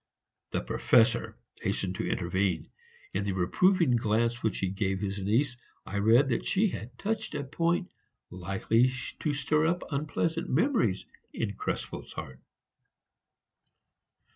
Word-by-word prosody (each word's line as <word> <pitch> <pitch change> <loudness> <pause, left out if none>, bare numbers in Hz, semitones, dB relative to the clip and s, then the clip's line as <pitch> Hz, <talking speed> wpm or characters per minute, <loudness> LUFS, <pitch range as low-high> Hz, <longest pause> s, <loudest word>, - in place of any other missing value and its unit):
The - - -1
Professor 115 -1 +3 0.2
hastened 95 -2 -1
to - - -2
intervene; 90 -1 -1 0.4
in 100 - 0
the 100 -1 -1
reproving 150 - +3
glance 115 +2 +1
which 110 - 0
he 95 - 0
gave 95 0 -1
his 100 0 -3
niece 120 +6 +1 0.3
I 100 - -3
read 115 +7 +5
that 115 - 0
she 205 +2 +2
had 125 -5 -7
touched 215 - -2
a - - -2
point 170 +6 0 0.4
likely 95 +7 +1 0.3
to 150 - 0
stir 155 +2 +2
up 175 +2 0
unpleasant 160 +4 -1
memories 170 - +2 0.3
in - - -2
Krespel's - - -4
heart. 70 -5 -7
115 Hz, 130 wpm, -29 LUFS, 95-155 Hz, 0.4 s, read